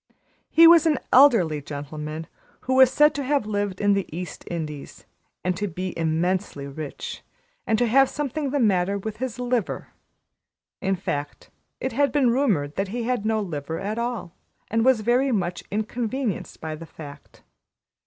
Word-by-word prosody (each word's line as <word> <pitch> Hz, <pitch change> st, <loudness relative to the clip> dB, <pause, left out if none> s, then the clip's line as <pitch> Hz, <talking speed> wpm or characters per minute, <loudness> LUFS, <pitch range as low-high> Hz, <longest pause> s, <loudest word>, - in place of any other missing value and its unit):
He 330 Hz, -, +7 dB
was 335 Hz, -1 st, +8 dB
an 305 Hz, -3 st, +3 dB, 0.2 s
elderly 220 Hz, -, +5 dB
gentleman 150 Hz, +2 st, -6 dB, 0.4 s
who 260 Hz, -, -1 dB
was 260 Hz, -1 st, +7 dB
said 300 Hz, +2 st, +5 dB
to 280 Hz, -, -3 dB
have 280 Hz, -3 st, +1 dB
lived 205 Hz, -3 st, -2 dB
in 205 Hz, 0 st, +3 dB
the 195 Hz, -1 st, -1 dB
East 175 Hz, +1 st, -6 dB
Indies, 155 Hz, -4 st, -6 dB, 0.4 s
and 180 Hz, 0 st, 0 dB
to 205 Hz, +3 st, -2 dB
be 185 Hz, +1 st, -5 dB
immensely 165 Hz, -1 st, -1 dB
rich 140 Hz, +1 st, -7 dB, 0.5 s
and 220 Hz, -, +2 dB
to 245 Hz, -, +2 dB
have 270 Hz, +3 st, +4 dB
something 295 Hz, 0 st, -3 dB
the 285 Hz, +2 st, 0 dB
matter 200 Hz, -4 st, +2 dB
with 215 Hz, +2 st, -5 dB
his 250 Hz, -1 st, -4 dB
liver, 245 Hz, -4 st, -2 dB, 0.9 s
in 195 Hz, 0 st, +1 dB
fact, 145 Hz, -5 st, -5 dB, 0.3 s
it 260 Hz, -, -2 dB
had 280 Hz, +3 st, +2 dB
been 260 Hz, -4 st, +3 dB
rumored 200 Hz, -, 0 dB
that 195 Hz, +1 st, 0 dB
he 235 Hz, +5 st, -3 dB
had 235 Hz, -3 st, -1 dB
no 220 Hz, -1 st, +1 dB
liver 160 Hz, -4 st, -4 dB
at 215 Hz, +3 st, -3 dB
all, 235 Hz, -7 st, -3 dB, 0.4 s
and 225 Hz, +1 st, +2 dB
was 245 Hz, -4 st, +3 dB
much 240 Hz, -8 st, +1 dB
inconvenienced 225 Hz, +1 st, -3 dB
by 155 Hz, 0 st, -5 dB
the 165 Hz, +2 st, -9 dB
fact. 145 Hz, -3 st, -12 dB
205 Hz, 165 wpm, -24 LUFS, 165-250 Hz, 0.9 s, was